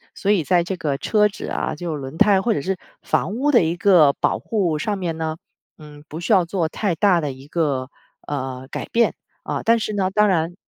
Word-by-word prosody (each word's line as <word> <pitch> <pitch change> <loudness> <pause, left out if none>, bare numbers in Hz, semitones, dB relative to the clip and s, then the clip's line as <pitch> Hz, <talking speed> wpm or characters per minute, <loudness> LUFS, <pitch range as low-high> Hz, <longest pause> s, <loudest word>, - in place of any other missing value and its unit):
所 205 - 0
以 185 -6 +2
在 175 +2 +2
这 185 +2 -4
个 145 -5 -2
车 210 +5 +3
子 205 - -8
啊， - - -2
就 165 0 -4
轮 135 +2 -7
胎 195 0 +5
或 230 +3 +1
者 145 - -2
是 190 +3 -2 0.3
房 200 - 0
屋 285 +4 +1
的 240 -9 +5
一 165 +1 0
个 170 -7 +5
保 - - 0
护 185 -8 -1
上 205 +5 -1
面 170 -3 -3
呢， 160 0 -3 0.4
嗯， 150 -1 -13
不 160 - -6
需 195 - -3
要 180 -3 +4
做 170 -3 -1
太 200 -2 -1
大 180 -2 +3
的 145 -2 -2
一 135 +2 -14
个， 140 -6 -1 0.4
呃， 130 -2 -4
改 - - -5
变， 235 0 +2 0.3
啊。 - - -3
但 230 0 +4
是 215 -1 -3
呢， 190 -2 0
当 210 +1 +3
然 170 -1 0
175 Hz, 240 characters per minute, -21 LUFS, 150-200 Hz, 0.4 s, 胎